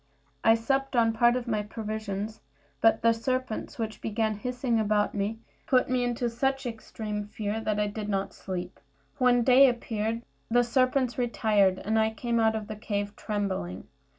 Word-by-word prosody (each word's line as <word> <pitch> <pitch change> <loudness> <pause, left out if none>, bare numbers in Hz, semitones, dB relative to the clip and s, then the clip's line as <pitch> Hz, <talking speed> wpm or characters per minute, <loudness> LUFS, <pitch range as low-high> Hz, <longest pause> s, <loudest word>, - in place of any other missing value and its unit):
I 225 0 +6
supped 270 +4 -1
on 230 -1 +4
part 240 +2 +4
of 250 -1 -3
my 215 -3 0
provisions, 215 -1 -5 0.4
but 225 - +4
the 230 0 +5
serpents, 255 0 -3
which 220 -2 -4
began 220 0 0
hissing 245 +2 -1
round 210 0 +2
me, 205 +2 -2 0.3
put 255 -3 +3
me 250 -1 +2
into 245 0 -1
such 270 +3 -1
extreme 220 -2 -5
fear 210 +1 -3
that 210 -1 0
I 210 - +2
did 210 0 -4
not 195 -1 -1
sleep. 180 0 -6 0.4
When 245 -1 +4
day 265 +2 +7
appeared 230 -1 -2 0.3
the 245 +1 +4
serpents 255 +1 +1
retired, 210 -6 +2
and 220 +3 0
I 220 0 +3
came 235 0 0
out 220 0 +3
of 215 -1 -3
the 215 +1 -6
cave 205 -1 -3
trembling. 195 - -3
225 Hz, 170 wpm, -28 LUFS, 210-245 Hz, 0.4 s, day